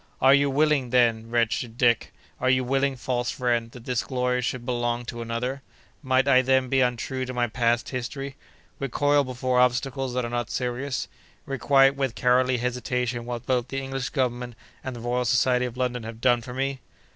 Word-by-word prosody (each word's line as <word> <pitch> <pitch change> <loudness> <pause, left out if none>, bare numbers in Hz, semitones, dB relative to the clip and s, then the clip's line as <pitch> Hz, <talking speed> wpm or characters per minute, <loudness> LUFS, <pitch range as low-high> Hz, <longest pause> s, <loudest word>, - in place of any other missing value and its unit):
"Are 135 +1 +6
you 140 0 +4
willing, 145 -2 +2
then, 115 -2 +2
wretched 115 0 0
Dick—are 120 +1 0
you 130 0 +3
willing, 135 +2 +1
false 120 -1 -2
friend—that 120 -1 -2
this 125 -2 0
glory 125 -1 -1
should 120 0 -3
belong 120 -1 -1
to 120 0 -6
another? 120 +4 -3 0.4
Must 130 -1 +2
I 130 -2 +6
then 130 0 +2
be 135 0 +3
untrue 125 +1 -1
to 130 0 -5
my 120 0 +2
past 120 0 0
history; 135 +2 -5 0.4
recoil 145 +2 +2
before 130 -1 -1
obstacles 125 +1 +1
that 125 -1 0
are 120 - -5
not 120 0 -2
serious; 130 +2 -2 0.4
requite 135 0 +3
with 135 -3 -2
cowardly 125 0 +3
hesitation 125 0 -2
what 120 0 -5
both 125 -1 0
the 135 - -5
English 135 -1 -4
Government 125 -3 -2 0.3
and 130 -1 -5
the 120 - -8
Royal 120 +1 0
Society 125 +1 +2
of 125 0 -6
London 125 -1 -1
have 110 0 -8
done 120 -1 +3
for 125 +2 -8
me?" 135 0 -2
125 Hz, 180 wpm, -25 LUFS, 120-130 Hz, 0.4 s, Are